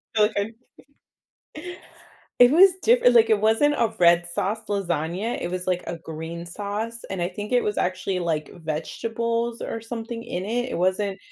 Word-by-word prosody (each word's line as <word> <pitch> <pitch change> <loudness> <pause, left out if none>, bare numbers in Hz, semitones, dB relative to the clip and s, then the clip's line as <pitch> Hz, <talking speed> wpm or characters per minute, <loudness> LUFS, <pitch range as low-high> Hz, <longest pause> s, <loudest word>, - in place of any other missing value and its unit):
feel 210 - +5
like - - -10
I 200 +1 +1 1.9
It 245 +1 +9
was 365 +5 +7
differ 470 - +5
like, 230 -2 +5
it 215 -2 +4
wasn't 225 +7 +3
a 225 -2 +1
red 175 0 +5
sauce 200 +5 -2
lasagna, 185 +2 -2
it 175 - -3
was, 185 0 -4
like, 180 -1 0
a 170 - -5
green 165 +1 -7
sauce, 210 +5 -4
and 190 -2 -3
I 175 - 0
think 205 +5 -7
it 245 - +4
was 210 - -2
actually, 185 +1 -1
like, 160 -4 -2
vegetables 230 +9 -2
or 225 - -5
something 230 0 -6
in 180 +2 -4
it, 245 +3 -1
It - - -3
wasn't 190 +2 0
205 Hz, 175 wpm, -24 LUFS, 175-230 Hz, 1.9 s, It